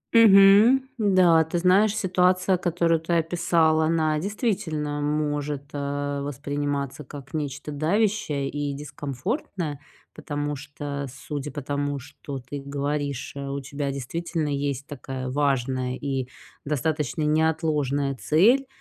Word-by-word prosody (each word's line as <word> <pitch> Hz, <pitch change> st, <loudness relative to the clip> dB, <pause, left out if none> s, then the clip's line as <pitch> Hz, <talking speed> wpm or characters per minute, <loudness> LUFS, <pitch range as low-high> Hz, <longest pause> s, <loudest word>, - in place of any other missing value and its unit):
Мгм. 215 Hz, +4 st, +7 dB, 0.2 s
Н-да, 185 Hz, -6 st, +5 dB
ты 160 Hz, +2 st, -3 dB
знаешь, 195 Hz, +4 st, +4 dB
ситуация, 185 Hz, -1 st, +2 dB
которую 170 Hz, -1 st, +1 dB
ты 165 Hz, +2 st, -3 dB
описал, 165 Hz, -1 st, +2 dB
она 155 Hz, -1 st, +2 dB
действительно 170 Hz, -, -2 dB
может, 145 Hz, -1 st, -1 dB
а, 145 Hz, 0 st, -2 dB
восприниматься 145 Hz, 0 st, -3 dB
как 135 Hz, 0 st, -11 dB
нечто 150 Hz, -1 st, -4 dB
давящее 155 Hz, -2 st, 0 dB
и 145 Hz, 0 st, -3 dB
дискомфортное. 145 Hz, -, -4 dB, 0.3 s
Потому 145 Hz, -1 st, -3 dB
что, 145 Hz, 0 st, -6 dB
судя 145 Hz, +2 st, -6 dB
по 145 Hz, -, -6 dB
тому, 145 Hz, 0 st, -2 dB
что 140 Hz, 0 st, -8 dB
ты 130 Hz, +3 st, -7 dB
говоришь, 140 Hz, -1 st, -3 dB
а, 140 Hz, 0 st, -5 dB
у 140 Hz, -, -2 dB
тебя 140 Hz, +1 st, -4 dB
действительно 155 Hz, +4 st, -3 dB
есть 140 Hz, -1 st, -2 dB
такая 130 Hz, -2 st, -6 dB
важная 130 Hz, -2 st, 0 dB
и 135 Hz, -3 st, -2 dB, 0.4 s
достаточно 150 Hz, +1 st, -1 dB
неотложная 150 Hz, -3 st, +1 dB
цель. 190 Hz, -, +3 dB
145 Hz, 120 wpm, -25 LUFS, 140-165 Hz, 0.4 s, Мгм